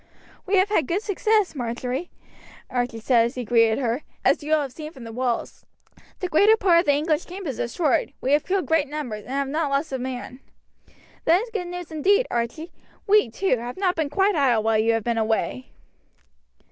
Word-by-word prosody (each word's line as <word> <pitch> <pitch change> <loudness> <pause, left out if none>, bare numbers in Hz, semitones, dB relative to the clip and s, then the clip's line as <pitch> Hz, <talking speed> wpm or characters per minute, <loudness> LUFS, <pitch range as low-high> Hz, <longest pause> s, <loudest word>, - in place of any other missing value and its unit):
"We 395 - +2
have 380 +2 +3
had 325 -10 +1
good 385 +5 -1
success, 425 0 +1
Marjory," 250 +4 -4 0.6
Archie 245 -2 -2
said 230 +1 +3
as 235 - -4
he 250 -2 -4
greeted 230 -1 +3
her, 245 0 -1 0.2
"as - - +3
you 300 +1 -5
will 310 -1 +3
have 270 - -6
seen 305 +3 -8
from 265 -6 -12
the 230 - -8
walls. 245 0 -3 0.6
The 365 - -1
greater 410 +7 +5
part 360 -5 +4
of 345 - 0
the 290 - +4
English 305 +2 0
camp 380 +2 -8
is 270 -6 -4
destroyed; 270 +4 0
we 265 - -1
have 295 +1 +4
killed 380 0 -1
great 320 -2 +2
numbers, 250 -9 -5
and 260 - -7
have 280 0 0
not 300 +2 -1
lost 275 +2 -1
a 265 - -2
man." 255 0 -6 0.9
"That 345 +6 +4
is 470 - -10
good 365 -5 -3
news 355 -2 -7
indeed, 400 +10 +3
Archie. 240 +9 -3 0.3
We, 415 - +4
too, 315 - 0
have 240 +1 -6
not 375 -2 +1
been 315 -3 -1
quite 385 +7 +2
idle 250 -7 +2
while 220 -1 +2
you 225 +1 +3
have 225 -1 -1
been 235 0 0
away." 225 +3 -1
290 Hz, 210 wpm, -24 LUFS, 245-355 Hz, 0.9 s, greater